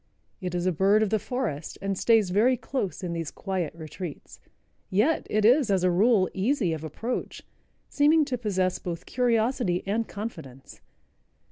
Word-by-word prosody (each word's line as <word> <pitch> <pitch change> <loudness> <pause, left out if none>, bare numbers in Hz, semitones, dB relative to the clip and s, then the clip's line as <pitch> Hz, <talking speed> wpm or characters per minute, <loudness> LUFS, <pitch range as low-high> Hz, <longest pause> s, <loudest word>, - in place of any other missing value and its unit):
It 180 -3 -4
is 175 0 -1
a 185 - +3
bird 195 +6 +3
of 210 - -1
the 220 - +2
forest 195 - -4
and 195 0 -2
stays 215 -2 +3
very 235 +7 +3
close 220 -8 -4
in 175 -1 -3
these 165 -3 -3
quiet 185 -5 -3
retreats. 160 0 -8 0.5
Yet 215 +12 +1
it 210 0 +1
is, 250 +1 +5
as 190 -2 +2
a 185 - +3
rule, 195 +1 +4
easy 195 - 0
of 160 -1 -5
approach, 225 - -4 0.4
seeming 300 +2 +3
to 265 -3 -2
possess 190 -5 0
both 170 -2 -6
curiosity 235 -6 +1
and 220 +3 -1
confidence. 160 - -8
195 Hz, 160 wpm, -26 LUFS, 175-235 Hz, 0.5 s, is